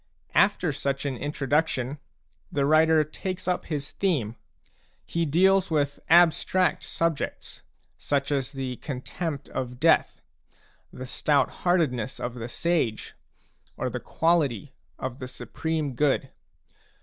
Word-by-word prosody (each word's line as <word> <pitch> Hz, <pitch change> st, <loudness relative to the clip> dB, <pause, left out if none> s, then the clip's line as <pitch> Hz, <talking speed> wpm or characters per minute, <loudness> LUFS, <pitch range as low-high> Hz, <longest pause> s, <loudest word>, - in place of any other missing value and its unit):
After 185 Hz, -5 st, +3 dB
such 140 Hz, 0 st, -2 dB
an 135 Hz, -2 st, -1 dB
introduction, 145 Hz, 0 st, -1 dB, 0.5 s
the 140 Hz, -1 st, +1 dB
writer 155 Hz, +1 st, +5 dB
takes 185 Hz, +5 st, -5 dB
up 180 Hz, -, 0 dB
his 145 Hz, -3 st, -3 dB
theme; 140 Hz, -, 0 dB, 0.7 s
he 170 Hz, -1 st, -1 dB
deals 190 Hz, +5 st, +4 dB
with 145 Hz, -3 st, 0 dB
abstract 175 Hz, +2 st, +4 dB
subjects, 165 Hz, -3 st, -3 dB, 0.4 s
such 140 Hz, 0 st, -1 dB
as 135 Hz, -3 st, 0 dB
the 130 Hz, -2 st, -4 dB
contempt 145 Hz, +2 st, -5 dB
of 125 Hz, -1 st, -4 dB
death, -, -, +3 dB, 0.7 s
the 130 Hz, -, -7 dB
stout 140 Hz, +1 st, +1 dB
heartedness 145 Hz, -9 st, +1 dB
of 120 Hz, -, -3 dB
the 120 Hz, -1 st, -6 dB
sage, 155 Hz, -9 st, -1 dB, 0.6 s
or -, -, -2 dB
the -, -, -3 dB
quality 150 Hz, -, +1 dB, 0.2 s
of 130 Hz, 0 st, -5 dB
the 130 Hz, -, -5 dB
Supreme 155 Hz, +2 st, -3 dB
Good. 135 Hz, 0 st, +1 dB
145 Hz, 120 wpm, -26 LUFS, 130-165 Hz, 0.7 s, writer